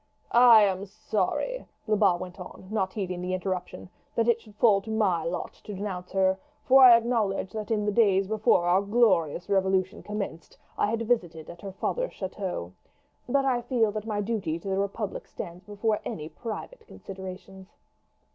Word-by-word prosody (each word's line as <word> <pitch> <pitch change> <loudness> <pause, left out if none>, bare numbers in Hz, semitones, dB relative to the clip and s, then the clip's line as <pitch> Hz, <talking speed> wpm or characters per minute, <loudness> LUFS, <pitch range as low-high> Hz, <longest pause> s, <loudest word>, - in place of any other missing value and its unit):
"I 235 -3 +8
am 195 0 0
sorry," 215 - -2 0.2
Lebat 205 -5 +3
went 180 0 -8
on, 185 +1 -10
not 195 -3 -1
heeding 185 -4 -3
the 185 +1 -1
interruption, 180 - -4 0.3
"that 230 0 +1
it 235 -1 +3
should 210 -3 -17
fall 210 -2 +4
to 220 - -11
my 200 -7 +1
lot 170 +2 -3
to 205 - -7
denounce 185 -2 -5
her, 190 0 +2 0.3
for 265 +1 +7
I 240 -2 +10
acknowledge 225 -5 -1
that 215 -1 -5
in 210 -2 0
the 210 - +1
days 200 -3 +3
before 215 -4 +2
our 180 +2 +4
glorious 200 -7 +2
Revolution 190 0 +1
commenced 205 -5 -6 0.2
I - - +1
have 225 +2 -1
visited 175 -9 -1
at 170 - -14
her 195 - -6
father's - - -2
chateau. 185 - -5 0.6
But 275 +2 +2
I 250 -3 +1
feel 235 -3 +1
that 215 +1 -5
my 210 -2 -1
duty 200 -7 -2
to 170 - -10
the 190 0 0
republic 200 +1 -3
stands 175 +2 -8
before 210 +1 -1
any 155 0 -5
private 435 - -8
considerations." 190 0 -9
200 Hz, 175 wpm, -27 LUFS, 185-220 Hz, 0.6 s, I